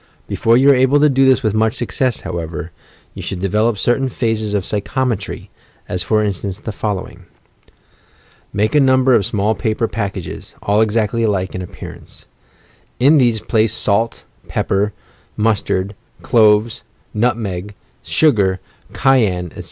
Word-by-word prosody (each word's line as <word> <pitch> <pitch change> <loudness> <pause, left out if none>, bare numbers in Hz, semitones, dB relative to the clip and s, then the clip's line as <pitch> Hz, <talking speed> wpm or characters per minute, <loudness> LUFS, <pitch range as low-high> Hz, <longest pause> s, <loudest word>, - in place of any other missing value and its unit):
Before 115 +1 +2
you 135 +2 +6
are - - +5
able 130 +3 +3
to 150 +1 +5
do 135 0 +3
this 130 0 +4
with 110 -3 +1
much 110 0 +1
success, 125 0 -1
however, 85 -1 -5 0.4
you - - -8
should 95 - -5
develop 105 +4 +1
certain 130 +6 +1
phases 110 -4 -1
of 100 - 0
psyehometry, 110 +1 -2 0.2
— - - -34
as 90 - -3
for 110 +4 +1
instance 100 -1 -3
the 110 - -5
following. 105 -2 -5 1.3
Make 105 +2 0
a 150 - +5
number 130 -1 +4
of 105 -4 +3
small 105 -1 0
paper 110 +1 -1
packages, 100 -6 -5
all 105 +2 +2
exactly 110 +1 +1
alike 100 -4 0
in 90 - -4
appearance. 90 - -10 0.7
In 145 +4 +5
these 120 -4 +2
place 110 -1 +1
salt, 110 +2 0 0.2
pepper, 100 +2 0 0.5
mus 110 -1 +2
tard, 95 +2 -2 0.3
cloves, 110 -1 +3 0.3
nutmeg, 105 -4 -2 0.3
sugar, 100 -11 +2 0.3
cayenne, 105 - +2
etc. - - -12
110 Hz, 145 wpm, -18 LUFS, 100-120 Hz, 1.3 s, you